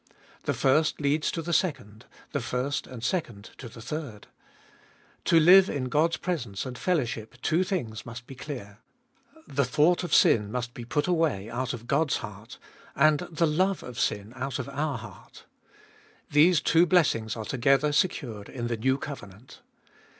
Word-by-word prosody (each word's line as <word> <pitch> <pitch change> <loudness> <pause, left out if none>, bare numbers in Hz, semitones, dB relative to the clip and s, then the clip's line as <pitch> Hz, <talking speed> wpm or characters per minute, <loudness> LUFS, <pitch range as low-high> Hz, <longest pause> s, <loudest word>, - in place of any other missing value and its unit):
The - - 0
first 150 +4 +2
leads 150 +1 +1
to 165 - -4
the 170 +2 -3
second, 110 - -1 0.2
the 140 - -1
first 125 +3 -2
and 125 -3 -9
second 120 - -3
to 120 - -8
the 115 0 -12
third. 130 -6 -6 1.0
To 165 - +5
live 185 +4 +7
in 130 -3 -3
God's 160 +4 +2
presence 130 - -3
and 130 -1 -6
fellowship 120 -8 -2
two 170 +4 +2
things 120 - -3
must 120 +1 -9
be 135 - -10
clear: 120 -7 -8 0.7
the 140 +1 0
thought 150 +9 +2
of 175 - -5
sin 105 -2 +4
must 120 0 -3
be 120 - -8
put 145 +5 0
away 155 - 0
out 130 +2 -2
of 120 -2 -7
God's 140 +3 +1
heart, 110 +1 -9 0.4
and 150 +1 +4
the 165 0 +1
love 185 +5 +1
of 120 -3 -8
sin 105 +2 -1
out 130 0 -3
of - - -5
our 145 -1 -2
heart. - - -13 0.9
These 155 +2 +5
two 165 +2 +4
blessings 125 - +2
are 110 -2 -5
together 135 +5 +2
secured 120 - -1
in 120 -3 -5
the 115 - -1
new 130 +4 +1
covenant. 120 -5 -10
135 Hz, 165 wpm, -27 LUFS, 115-155 Hz, 1.0 s, live